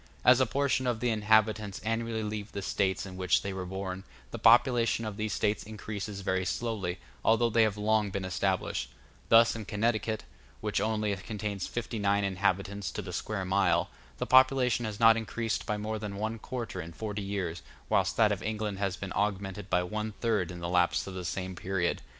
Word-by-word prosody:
As 125 0 +7
a 130 - +3
portion 140 -2 +1
of 120 -2 0
the 120 0 +1
inhabitants 110 -1 +2
annually 115 0 -1
leave 105 -1 -5
the 100 - -4
States 95 -1 0
in 95 -1 -8
which 90 -2 +2
they 100 - -3
were 95 -1 -5
born, 95 0 -4 0.3
the 115 - -5
population 115 0 +4
of 105 -2 -4
these 110 0 -2
States 105 +1 0
increases 105 -1 -6
very 95 0 0
slowly, 95 -2 -2 0.3
although 115 +1 +3
they 115 +1 +4
have 110 -2 +2
long 105 0 +2
been 95 0 -3
established: 95 +1 -1 0.4
thus 115 0 +6
in 110 - -5
Connecticut, 110 +1 0 0.4
which 105 -1 -1
only 110 -2 0
contains 105 -1 -4
fifty 120 -1 -4
nine 100 0 +2
inhabitants 100 0 0
to 105 - -4
the 90 -1 -7
square 100 +1 -3
mile, 95 +2 +2 0.3
the - - -2
population 130 -2 +4
has 105 -2 -5
not 115 -1 +7
increased 115 -1 -2
by 105 - 0
more 110 +1 -3
than 105 -2 -5
one 110 +2 -3
quarter 115 -6 -5
in 85 0 -9
forty 105 +2 -4
years, 95 -4 -3 0.3
whilst - - +1
that - - +5
of - - -2
England 105 -2 -3
has 100 -2 -1
been 100 -2 -5
augmented 100 -1 -2
by 90 0 +2
one 110 +3 -3
third 110 -7 0
in 90 -1 -7
the 85 - -2
lapse 90 0 +2
of 95 - -7
the 95 -1 -5
same 95 +1 -3
period. 90 0 -1
105 Hz, 195 wpm, -30 LUFS, 95-110 Hz, 0.4 s, As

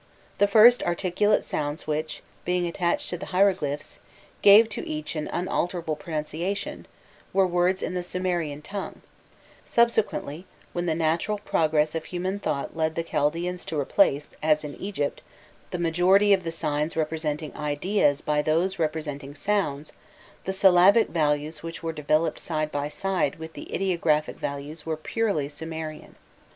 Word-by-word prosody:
The 205 - +5
first 225 +4 +7
articulate 185 +4 +1
sounds 145 0 -3
which, 155 +1 -3 0.2
being 180 0 0
attached 170 0 -1
to 175 - -3
the - - -7
hieroglyphs, 180 -7 0 0.4
gave 210 +3 +8
to - - -5
each 155 +1 -4
an 155 -1 -3
unalterable 175 -2 -1
pronunciation, 165 +5 -4 0.5
were 195 0 +4
words 180 +1 +1
in - - -2
the 180 - -1
Sumerian 175 -5 -2
tongue; 200 +5 -6 0.6
subsequently, 210 -8 +1 0.3
when 175 0 -2
the 160 - +1
natural 165 +6 0
progress 155 -6 +1
of 165 -1 -3
human 185 +3 -3
thought 150 -7 -3
led 160 -1 0
thi 165 - -1
Chaldaeans 170 +3 -1
to 155 - -3
replace, 145 0 +2
as 155 0 +2
in 145 -1 -6
Egypt, 190 -8 -3 0.5
the - - -3
majority 180 +5 +4
of 190 -2 +2
the 165 - -3
signs 150 0 -2
representing 155 -1 -2
ideas 150 0 +1
by 150 0 +1
those 170 +5 0
representing 150 -3 -3
sounds, 155 -5 -1 0.5
the 190 - -1
syllabic 190 +3 +5
values 150 -1 0
which 165 +1 -7
were 165 0 -2
developed 155 +1 0
side 155 -2 -2
by 145 0 -2
side 185 -4 -1
with 160 0 -9
the - - -9
ideographic 170 -5 0
values 145 +2 -5
were 160 0 -3
purely 195 -3 -1
Sumerian. 155 +1 -7
165 Hz, 145 wpm, -26 LUFS, 150-185 Hz, 0.6 s, gave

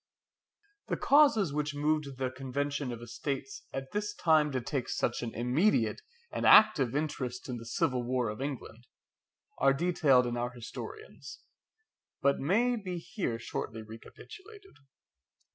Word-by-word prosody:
The - - -1
causes 275 - +4
which 150 -1 -2
moved 150 -2 -1
the 130 -1 -2
Convention 140 +1 -3
of 120 0 -7
Estates 135 +3 -5
at 135 0 -6
this 210 0 -3
time 155 -3 +3
to 130 - -1
take 125 +1 -3
such 120 - -1
an 120 - -4
immediate 125 - +1 0.3
and - - -3
active 150 - +6
interest 130 -4 -3
in 125 -2 -4
the 115 0 -9
civil 125 +1 0
war 125 0 -1
of 105 +4 -6
England, 125 -4 -6 0.7
are 135 +1 +5
detailed 145 -6 +3
in 120 0 -2
our 120 0 -1
historians, 275 - -9 0.8
but 140 0 +2
may 230 - +2
be 185 -5 -5
here 165 - -3
shortly 110 -1 -5
recapitulated. 390 - -13
135 Hz, 140 wpm, -30 LUFS, 125-170 Hz, 0.8 s, active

